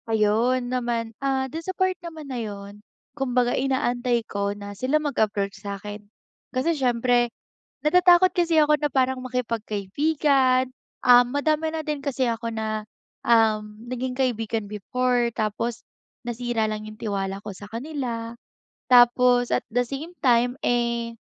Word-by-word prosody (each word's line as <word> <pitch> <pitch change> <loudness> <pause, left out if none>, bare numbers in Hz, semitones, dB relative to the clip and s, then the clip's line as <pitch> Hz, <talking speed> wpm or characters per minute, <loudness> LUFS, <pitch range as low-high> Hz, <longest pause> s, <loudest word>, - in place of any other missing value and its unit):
Ayun 230 +4 +2
naman, 235 -2 -2
ah, 270 -1 0
dun 315 +5 -6
sa 375 +3 -6
part 375 0 +2
naman 320 -3 -8
na 255 -3 -4
yun, 205 -1 -8 0.3
kumbaga 250 -3 +1
inaantay 245 -3 0
ko 200 -1 -2
na 205 0 -8
sila 255 +9 +1
mag-approach 215 -9 -1
sa 200 -1 -5
akin 205 +1 -8 0.5
kasi 270 +6 0
siyempre, 245 -3 +2 0.5
natatakot 355 +3 +5
kasi 335 -3 +3
ako 300 0 +4
na 295 -1 -2
parang 260 -1 +1
makipag-kaibigan, 255 +3 +1 0.3
ah, 245 -1 +7
madami 305 +5 0
na 320 - -2
din 300 -3 -4
kasi 265 -3 0
ako 230 0 -3
na, 215 -1 -3 0.4
um, 215 -2 +2
naging 255 +1 -3
kaibigan 225 -4 -1
before 240 +3 0
tapos 225 +2 -2 0.5
nasira 240 -2 -1
lang 215 0 -4
yung 215 +1 -11
tiwala 195 -2 -3
ko 205 -2 -8
sa 205 - -10
kanila. 235 -3 -4 0.5
Tapos 245 0 +5
at - - +1
the 245 +2 +1
same 275 +6 -6 0.2
time, 245 +1 +3
eh, 235 -1 0
245 Hz, 140 wpm, -24 LUFS, 220-270 Hz, 0.5 s, ah